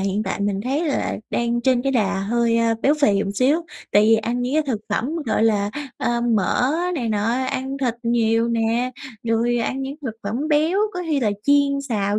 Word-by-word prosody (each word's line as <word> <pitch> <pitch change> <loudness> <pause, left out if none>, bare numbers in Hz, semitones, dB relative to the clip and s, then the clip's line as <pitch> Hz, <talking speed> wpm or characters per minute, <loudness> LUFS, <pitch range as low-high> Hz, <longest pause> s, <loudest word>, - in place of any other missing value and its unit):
hiện 195 +2 -1
tại 195 0 -3
mình 200 -1 0
thấy 280 +6 0
là 280 - -1
đang 235 0 0
trên 255 -1 +2
cái 275 +1 0
đà 205 -6 +1
hơi, 230 +3 +1
a, 230 0 +2
béo 285 - +4
phì, 200 -6 +4
ừm, 200 -1 -2
xíu 265 +10 +2 0.3
tại 205 - +6
vì 225 +1 +5
ăn 235 +3 -2
những 250 +3 -2
cái 310 - +3
thực 230 -6 -1
phẩm, 245 +6 -1 0.2
gọi 220 - +1
là, 205 -2 +2 0.3
ờ, 240 0 0
mỡ 235 +2 +1 0.2
này 245 -8 -2
nọ, 210 -1 0 0.3
ăn 265 +1 -3
thịt 250 -4 0
nhiều 230 -1 +2
nè, 235 +2 0 0.3
rồi 235 +1 +1
ăn 260 +3 -2
những 275 +2 -5
thực 230 -5 -4
phẩm 235 +10 -3
béo, 315 +5 +2
có 360 - -4
khi 295 -3 0
là 215 -4 +1
chiên 280 0 +3
xào 205 -2 0
235 Hz, 210 wpm, -22 LUFS, 220-265 Hz, 0.3 s, tại